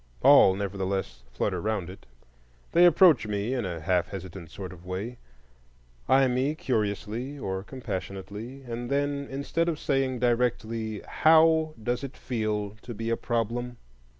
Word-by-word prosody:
All, 95 - +7
nevertheless, 95 -1 -3
flutter 90 +8 -1
round 105 -4 -1
it. 95 -6 -12 0.6
They 175 +1 +6
approach 165 - +5
me 105 +4 -1
in 125 -5 -1
a 85 -3 -5
half 90 +2 +1
hesitant 95 -3 -8
sort 95 +3 -7
of 90 -1 -14
way, 100 +7 -5 0.9
eye 135 0 +5
me 130 +4 0
curiously 115 +2 -2
or 95 -7 -3
compassionately, 105 +2 -6
and 120 -1 -5
then, 140 0 -1
instead 145 +5 -1
of 160 - -2
saying 135 -3 0
directly, 115 -3 0
How 160 0 +4
does 120 +4 -1
it 135 - -7
feel 110 -4 -2
to 120 - -8
be 115 +2 -3
a - - +3
problem? 120 +1 -2
115 Hz, 145 wpm, -27 LUFS, 100-135 Hz, 0.9 s, All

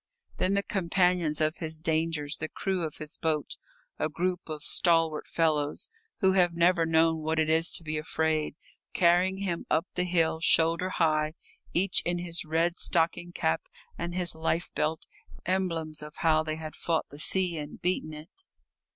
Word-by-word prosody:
Then 190 +2 +1
the 200 - +1
companions 180 -4 +1
of 155 +1 +1
his 160 -3 -3
dangers, 160 -2 -1
the 155 - -4
crew 190 -2 -2
of 155 -3 -3
his 155 -1 -5
boat, 155 -3 -1 0.4
a 155 - 0
group 180 +3 -1
of 155 -1 -5
stalwart 165 -3 +3
fellows 150 - 0 0.3
who 190 -2 +5
have 180 -3 +3
never 170 -1 +3
known 160 0 +3
what 160 +1 -2
it 155 0 +2
is 165 +2 +3
to - - 0
be 155 -1 -2
afraid, 155 -1 -1 0.4
carrying 180 +2 +3
him 190 -4 -3
up 160 +3 +2
the 180 - 0
hill, 165 -3 +1
shoulder 165 +2 +2
high, 155 -3 +1 0.4
each 185 +2 +2
in 175 0 -1
his 175 -1 -3
red 165 +2 0
stocking 175 +1 0
cap 80 - -1 0.3
and 175 +1 -4
his 180 -1 +3
life 160 +2 -1
belt, 155 +1 -1 0.4
emblems 165 -5 -1
of 150 0 -9
how 155 -2 +3
they 155 0 -3
had 155 -1 -7
fought 165 -2 -1
the 145 - -11
sea 175 0 +1
and 145 0 -8
beaten 180 -3 0
it. 155 - -10
165 Hz, 170 wpm, -28 LUFS, 155-175 Hz, 0.4 s, who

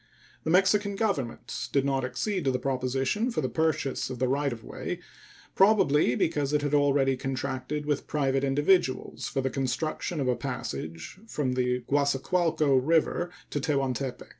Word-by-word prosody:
The - - 0
Mexican 195 +3 +3
Government 185 - -2
did 140 -1 +2
not 135 -1 0
accede 185 +7 -2
to 135 - +3
the 125 - 0
proposition 135 - 0
for 235 - -1
the 130 - 0
purchase 160 -6 0
of 130 - -5
the 130 +1 +1
right 140 +2 +1
of 115 -2 -7
way, - - -5 0.5
probably 175 - +4
because 145 -3 0
it 150 -1 +2
had 145 0 -1
already 140 -2 +3
contracted 135 +2 -3
with 145 -1 -1
private 135 -2 0
individuals 145 +1 +1
for 135 - -1
the 135 0 -1
construction 145 +5 -2
of 135 - 0
a 125 - +2
passage 80 - -5
from 140 - -1
the 125 0 0
Guasacualco 145 +2 +2
River 165 +5 +2 0.2
to 145 - -1
Tehuantepec. 135 -3 -2
140 Hz, 160 wpm, -28 LUFS, 130-155 Hz, 0.5 s, probably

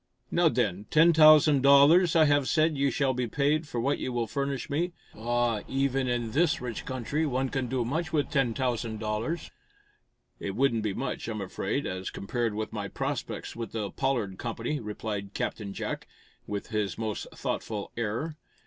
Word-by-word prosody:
Now, 170 -1 +4
then, 105 - -1
ten 165 +2 +6
thousand 155 -2 +7
dollars 145 +6 +6
I 160 -1 +6
have 145 -2 +3
said 155 0 +3
you 140 0 +2
shall 135 0 +1
be 125 -1 -1
paid 150 +6 +1
for 120 - -3
what 140 +5 0
you 130 - -3
will 120 -1 0
furnish 140 +1 -3
me. 170 +5 -1 0.2
Ah, 120 -1 0
even 135 -1 0
in 120 -2 -1
this 155 +5 +2
rich 120 -3 -5
country, 130 +4 -2
one 135 -3 0
can 130 -1 -2
do 125 -1 -1
much 160 +8 -2
with 150 -3 0
ten 135 -5 +2
dollars!" 115 +2 -2 0.9
"It 100 - -4
wouldn't 120 -2 +2
be 105 -2 -2
much, 135 - -3
I'm 110 -2 -3
afraid, 95 +7 -2
as 95 0 -4
compared 115 +2 -2
with 110 0 -4
my 105 -2 -3
prospects - - -4
with 115 -1 -6
the 105 -3 -3
Pollard 120 -9 -1
Company," 120 +5 -3
replied 105 -2 -5
Captain 105 -3 -3
Jack, - - -4 0.4
with 105 +1 -4
his 105 -3 -1
most 110 -2 -3
thoughtful 105 -3 -3
air. 115 +8 -2
125 Hz, 175 wpm, -28 LUFS, 110-145 Hz, 0.9 s, thousand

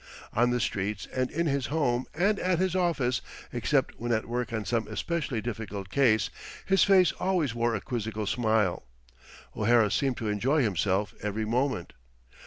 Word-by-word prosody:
On 120 +2 +3
the 125 0 +1
streets 100 -1 -2
and 130 -1 0
in 170 +2 -1
his 140 -3 0
home 130 -5 0
and 200 +5 +2
at 185 -1 +1
his 185 +1 0
office 155 -10 +1 0.3
except - - 0
when 120 +1 -2
at 110 -1 +1
work 120 0 -2
on 110 -2 -3
some 115 -3 0
especially 125 - -2
difficult 105 -4 -5
case 110 -5 +3 0.3
his 195 0 +4
face 185 -4 +5
always 175 -9 +1
wore 120 0 0
a 100 - -3
quizzical 110 -4 -3
smile. 110 -4 +1 0.7
O'Hara 110 -1 +3
seemed 135 -3 0
to 110 - -3
enjoy 130 +8 +2
himself 100 -1 0
every 105 +1 -2
moment. 125 -4 -1
120 Hz, 165 wpm, -28 LUFS, 110-140 Hz, 0.7 s, face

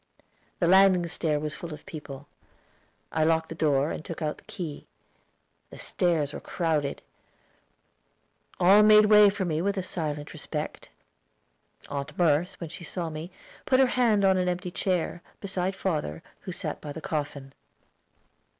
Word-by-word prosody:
The 175 - +1
landing 185 0 +5
stair 160 -3 -1
was 150 0 -3
full 160 0 -7
of - - -17
people. 145 -4 -9 0.8
I 160 - +1
locked 160 0 +2
the - - -5
door, 150 -2 +1
and - - -5
took 165 - -7
out 155 -2 -3
the - - -22
key; 165 -7 -7 0.8
the - - -12
stairs 160 -5 0
were - - -5
crowded. 155 -5 -2 1.6
All 190 +4 +7
made 215 0 +7
way 210 -1 +7
for 195 -1 -2
me 160 -2 -1
with 200 +2 0
a 190 - -1
silent 150 -5 -4
respect. - - -5 1.0
Aunt 145 +1 -5
Merce, 170 +2 +2
when 165 -3 -6
she 170 - -8
saw 170 -1 -4
me, 155 +3 -6 0.4
put 260 -1 +4
her 265 - +7
hand 220 -5 +3
on 190 -1 +4
an 180 0 +1
empty 180 0 -3
chair, 175 -2 -1 0.2
beside 190 -1 -2
father, 155 - -2 0.2
who - - -7
sat - - -4
by 150 - -6
the 160 - -7
coffin. 145 -3 -4
170 Hz, 160 wpm, -27 LUFS, 150-190 Hz, 1.6 s, All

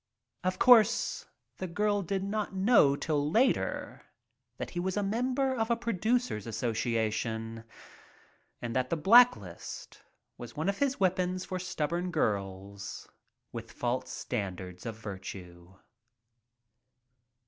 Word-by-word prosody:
Of 185 0 0
course, 235 -1 +5 0.3
the 185 - -4
girl 205 +3 +1
did 190 +1 -2
not 205 0 -2
know 190 - +5
till 145 -1 0
later 245 - +1 0.6
that - - -5
he 175 - -3
was 185 +2 -1
a 205 - +1
member 255 +6 0
of 225 -1 -1
a 235 - +3
producers 230 - -1
association, 115 -1 -2 1.0
and 120 0 -3
that 130 0 +1
the 165 - 0
blacklist 175 - +3 0.4
was 120 +5 -9
one 160 +5 0
of 200 - -2
his 275 -3 +1
weapons 185 -1 +1
for 185 - -4
stubborn 175 -1 -2
girls 100 - -3 0.4
with - - -7
"false" 125 +1 -2
standards 95 -3 -5
of 115 - -4
virtue. 95 -4 -9
170 Hz, 120 wpm, -30 LUFS, -, 1.0 s, course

